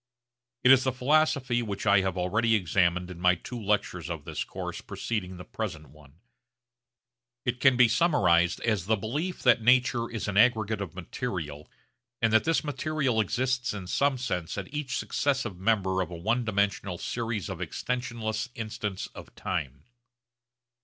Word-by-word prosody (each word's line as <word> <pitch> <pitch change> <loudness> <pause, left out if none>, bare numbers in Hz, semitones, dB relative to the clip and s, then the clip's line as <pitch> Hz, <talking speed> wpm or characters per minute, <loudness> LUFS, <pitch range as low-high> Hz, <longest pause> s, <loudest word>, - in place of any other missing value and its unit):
It 130 - +7
is 130 -1 +7
the 130 - +1
philosophy 130 -1 +2
which 100 -3 -4
I 100 -1 +5
have 95 -1 -2
already 110 +6 +2
examined 90 -1 +1
in 90 - -9
my 90 0 +4
two 120 +7 -7
lectures 105 0 -1
of - - -5
this - - -3
course - - -6
preceding 95 -5 -4
the 90 - -8
present 85 -9 -5
one. 75 -2 -18 1.3
It 125 -1 -1
can 130 -1 +5
be 125 -1 +7
summarised 110 - +3
as 105 -6 0
the 110 - +3
belief 145 - -3
that 120 -2 +5
nature 125 0 +3
is 115 -3 -4
an 100 -1 -1
aggregate 110 -2 +3
of 90 -4 -6
material 85 - -5 0.5
and 115 -1 +2
that 110 - +4
this 165 +1 +2
material 145 -4 0
exists 125 +2 -1
in 100 -3 -6
some 140 +8 +1
sense 90 -10 -3
at 100 +6 -6
each 150 -3 -2
successive 130 -10 -1
member 95 -2 +1
of 90 - -3
a 85 - -7
one 115 +8 0
dimensional 100 -3 0
series 115 -2 -3
of - - -6
extensionless 120 -2 -3
instants 105 -3 -4
of - - -12
time. 70 -6 -4
110 Hz, 160 wpm, -28 LUFS, 95-125 Hz, 1.3 s, It